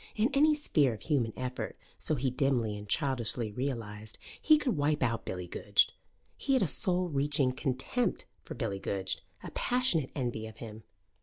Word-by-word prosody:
In 225 Hz, +6 st, +2 dB
any 300 Hz, +2 st, +5 dB
sphere 145 Hz, -, +2 dB
of -, -, -13 dB
human 130 Hz, -8 st, +1 dB
effort, 125 Hz, 0 st, -4 dB, 0.2 s
so 155 Hz, -, 0 dB
he 130 Hz, -1 st, 0 dB
dimly 125 Hz, -5 st, +1 dB
and 105 Hz, 0 st, -9 dB
childishly 120 Hz, -5 st, 0 dB
realized, 110 Hz, -3 st, -4 dB, 0.2 s
he 310 Hz, -1 st, +6 dB
could 275 Hz, -5 st, 0 dB
wipe 145 Hz, -1 st, +1 dB
out 115 Hz, -3 st, 0 dB
Billy 90 Hz, -1 st, -4 dB
Goodge. 85 Hz, -, +3 dB, 0.5 s
He 275 Hz, -, 0 dB
had 260 Hz, -5 st, +4 dB
a -, -, +2 dB
soul 180 Hz, +4 st, +2 dB
reaching 140 Hz, -2 st, +1 dB
contempt 130 Hz, -, -1 dB, 0.2 s
for -, -, -8 dB
Billy 105 Hz, -6 st, -2 dB
Goodge, 95 Hz, -1 st, -2 dB, 0.2 s
a -, -, -7 dB
passionate 245 Hz, -, +2 dB
envy 120 Hz, -5 st, -2 dB
of 110 Hz, 0 st, -12 dB
him. 110 Hz, -2 st, -8 dB
130 Hz, 170 wpm, -31 LUFS, 110-160 Hz, 0.5 s, he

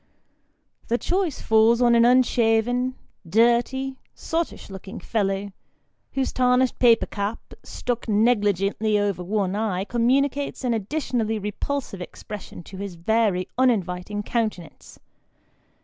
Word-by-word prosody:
The 235 Hz, -, +1 dB
choice 355 Hz, 0 st, -1 dB
falls 220 Hz, +1 st, +4 dB
on 240 Hz, -1 st, +4 dB
an 235 Hz, 0 st, +5 dB
unshaven, 245 Hz, 0 st, +2 dB, 0.3 s
dirty, 240 Hz, +5 st, +2 dB, 0.2 s
sottish 325 Hz, -10 st, -3 dB
looking 190 Hz, 0 st, -8 dB
fellow, 200 Hz, -2 st, -1 dB, 0.6 s
whose 270 Hz, -1 st, -1 dB
tarnished 250 Hz, 0 st, +2 dB
paper 235 Hz, -2 st, +5 dB
cap, 205 Hz, +2 st, -5 dB
stuck 245 Hz, -1 st, -4 dB
negligently 210 Hz, -1 st, +2 dB
over 200 Hz, -3 st, 0 dB
one 195 Hz, 0 st, -1 dB
eye, 205 Hz, -4 st, -1 dB
communicates 265 Hz, +6 st, 0 dB
an 245 Hz, -2 st, +1 dB
additionally 225 Hz, -1 st, -1 dB
repulsive 210 Hz, +1 st, -4 dB
expression 205 Hz, 0 st, -9 dB
to 190 Hz, -, -11 dB
his 195 Hz, -2 st, -6 dB
very 195 Hz, +1 st, +1 dB
uninviting 205 Hz, -4 st, 0 dB
countenance. 215 Hz, -8 st, -4 dB
225 Hz, 110 wpm, -24 LUFS, 200-250 Hz, 0.6 s, an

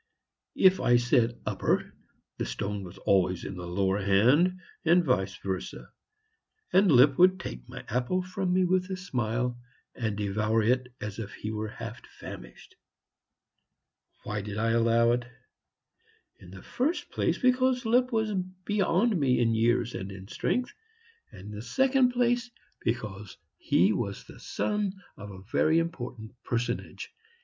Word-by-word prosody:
If 190 Hz, 0 st, +5 dB
I 120 Hz, 0 st, +4 dB
said 120 Hz, -1 st, +2 dB
"upper," -, -, -1 dB, 0.5 s
the -, -, -1 dB
stone 100 Hz, +12 st, -4 dB
was 90 Hz, +1 st, -10 dB
always 95 Hz, -2 st, +1 dB
in 100 Hz, -, -5 dB
the 90 Hz, -1 st, -7 dB
lower 95 Hz, +3 st, 0 dB
hand, 125 Hz, -, +3 dB, 0.2 s
and 170 Hz, +1 st, +4 dB
vice 95 Hz, -8 st, 0 dB
versa. 95 Hz, -1 st, -5 dB, 0.8 s
And 190 Hz, 0 st, +5 dB
Lipp 130 Hz, +1 st, +6 dB
would 185 Hz, +1 st, +6 dB
take -, -, -8 dB
my -, -, -9 dB
apple 125 Hz, +11 st, 0 dB
from 185 Hz, 0 st, -2 dB
me 185 Hz, 0 st, +3 dB
with 185 Hz, +1 st, +1 dB
a 190 Hz, -, -3 dB
smile, 120 Hz, -, -2 dB, 0.3 s
and 110 Hz, -4 st, -3 dB
devour 105 Hz, +2 st, 0 dB
it 125 Hz, +2 st, +1 dB
as 105 Hz, +1 st, -5 dB
if 105 Hz, -2 st, -6 dB
he 110 Hz, -, -5 dB
were 110 Hz, 0 st, -3 dB
half 110 Hz, -, -8 dB, 0.2 s
famished. 60 Hz, 0 st, -11 dB, 1.5 s
Why 105 Hz, -1 st, -3 dB
did 105 Hz, +1 st, -6 dB
I 115 Hz, +1 st, +1 dB
allow 115 Hz, 0 st, +3 dB
it? 120 Hz, 0 st, 0 dB, 1.1 s
In 90 Hz, -, -14 dB
the 95 Hz, 0 st, -11 dB
first 300 Hz, +8 st, -2 dB
place -, -, 0 dB
because 255 Hz, -1 st, +2 dB
Lipp 250 Hz, +3 st, +3 dB
was 220 Hz, -2 st, 0 dB, 0.3 s
beyond 205 Hz, +2 st, +2 dB
me 130 Hz, -3 st, +2 dB
in 115 Hz, -1 st, +2 dB
years 120 Hz, +1 st, +1 dB
and 95 Hz, +1 st, -5 dB
in 95 Hz, 0 st, -10 dB
strength, 250 Hz, -, -1 dB, 0.6 s
and 90 Hz, -, -12 dB
in 105 Hz, +2 st, -9 dB
the 105 Hz, 0 st, -6 dB
second 265 Hz, -, +3 dB
place, 245 Hz, 0 st, +1 dB, 0.3 s
because 105 Hz, -4 st, -4 dB, 0.2 s
he 95 Hz, +5 st, +3 dB
was 100 Hz, -4 st, -3 dB
the -, -, -14 dB
son 210 Hz, -2 st, -2 dB, 0.2 s
of 105 Hz, 0 st, -9 dB
a 95 Hz, -1 st, -10 dB
very 155 Hz, +9 st, +2 dB
important 125 Hz, -10 st, -3 dB
personage. 120 Hz, 0 st, -3 dB
120 Hz, 150 wpm, -28 LUFS, -, 1.5 s, Lipp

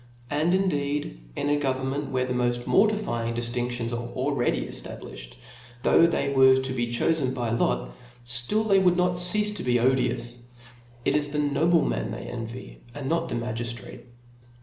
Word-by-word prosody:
And 155 Hz, +4 st, +1 dB
indeed^ 145 Hz, -, -1 dB, 0.2 s
in -, -, -2 dB
a 145 Hz, 0 st, +2 dB
government 135 Hz, +1 st, -2 dB
where 130 Hz, -1 st, 0 dB
the 125 Hz, -, -2 dB
moft 120 Hz, 0 st, 0 dB
mortifying 195 Hz, -, +1 dB
diftinc 120 Hz, +1 st, -2 dB
tions 120 Hz, -1 st, -3 dB
are 120 Hz, 0 st, -3 dB
already 130 Hz, -1 st, 0 dB
eftabliflied, -, -, -8 dB, 0.5 s
though 170 Hz, -, +5 dB
they 140 Hz, -4 st, 0 dB
were 130 Hz, -1 st, +6 dB
to 130 Hz, 0 st, -1 dB
be 120 Hz, -2 st, -1 dB
chofen 130 Hz, +2 st, 0 dB
by 120 Hz, -3 st, -2 dB
lot, -, -, 0 dB, 0.3 s
ftill 120 Hz, -, +1 dB
thqy 195 Hz, -3 st, +4 dB
would 180 Hz, -1 st, +3 dB
not 180 Hz, 0 st, +3 dB
ceafe 210 Hz, +4 st, +3 dB
to 180 Hz, -, -4 dB
be 120 Hz, -1 st, +2 dB
odious; 120 Hz, -1 st, 0 dB, 0.7 s
it -, -, +2 dB
is 145 Hz, -1 st, +1 dB
the 150 Hz, -, -3 dB
nobleman 155 Hz, +4 st, +1 dB
they -, -, -6 dB
envy, 115 Hz, +1 st, -8 dB
and 140 Hz, -2 st, -5 dB
not 165 Hz, 0 st, 0 dB
the -, -, -2 dB
magiftrate. 120 Hz, 0 st, -5 dB
130 Hz, 165 wpm, -26 LUFS, 120-160 Hz, 0.7 s, were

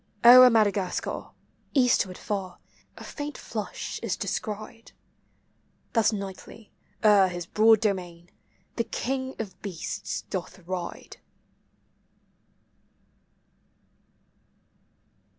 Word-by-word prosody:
O'er 250 Hz, +1 st, +11 dB
Madagascar, 205 Hz, -5 st, 0 dB, 0.5 s
eastward 245 Hz, -8 st, +2 dB
far. 190 Hz, -3 st, -4 dB, 0.4 s
a -, -, -10 dB
faint 290 Hz, -1 st, -6 dB
flush 215 Hz, -3 st, -5 dB
is -, -, -2 dB
descried: 215 Hz, +2 st, -5 dB, 0.5 s
— -, -, -42 dB
Thus 225 Hz, -2 st, +3 dB
nightly, 200 Hz, +2 st, -8 dB, 0.3 s
o'er 205 Hz, -3 st, +6 dB
his 175 Hz, -1 st, -5 dB
broad 220 Hz, +3 st, +4 dB
domain, 180 Hz, -5 st, -3 dB, 0.5 s
the 230 Hz, -, +1 dB
king 260 Hz, +2 st, -3 dB
of 200 Hz, -5 st, -7 dB
beasts 185 Hz, -6 st, -5 dB
doth 185 Hz, 0 st, -6 dB
ride. 185 Hz, -1 st, -6 dB
210 Hz, 85 wpm, -26 LUFS, 185-230 Hz, 0.5 s, O'er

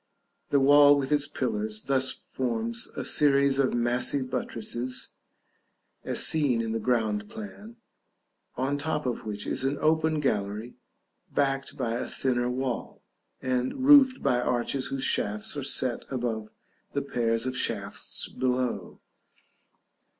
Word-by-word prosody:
The 140 Hz, -, +3 dB
wall 145 Hz, +1 st, +7 dB
with 135 Hz, 0 st, -2 dB
its 145 Hz, -1 st, +2 dB
pillars 110 Hz, -6 st, -3 dB
thus 135 Hz, -1 st, +1 dB
forms 115 Hz, -2 st, -3 dB
a -, -, -4 dB
series 140 Hz, -1 st, +3 dB
of 135 Hz, -3 st, +2 dB
massy 120 Hz, +3 st, +2 dB
buttresses 125 Hz, 0 st, -3 dB, 0.9 s
(as -, -, +3 dB
seen 145 Hz, -7 st, +2 dB
in 115 Hz, -1 st, -2 dB
the 115 Hz, -, -1 dB
ground 110 Hz, -3 st, 0 dB
plan), 215 Hz, +1 st, -9 dB, 0.8 s
on 135 Hz, +3 st, -1 dB
the -, -, -3 dB
top 150 Hz, -1 st, -2 dB
of 120 Hz, -3 st, -3 dB
which 105 Hz, -1 st, -5 dB
is -, -, -2 dB
an 135 Hz, +2 st, 0 dB
open 160 Hz, 0 st, +2 dB
gallery, 105 Hz, -3 st, -2 dB, 0.6 s
backed 135 Hz, -1 st, -1 dB
by 120 Hz, -4 st, -1 dB
a 120 Hz, -, -3 dB
thinner 125 Hz, -2 st, 0 dB
wall, 125 Hz, -1 st, -4 dB, 0.4 s
and 130 Hz, -, -1 dB
roofed 275 Hz, -2 st, +7 dB
by 125 Hz, -, +2 dB
arches 125 Hz, +2 st, -1 dB
whose 135 Hz, -1 st, -3 dB
shafts 105 Hz, +4 st, 0 dB
are 145 Hz, -, -3 dB
set 130 Hz, -2 st, -1 dB
above 115 Hz, -4 st, -3 dB, 0.4 s
the 140 Hz, -, -1 dB
pairs 115 Hz, -3 st, 0 dB
of 130 Hz, 0 st, -2 dB
shafts -, -, -1 dB
below. 125 Hz, -7 st, -2 dB
130 Hz, 135 wpm, -27 LUFS, 115-140 Hz, 0.9 s, wall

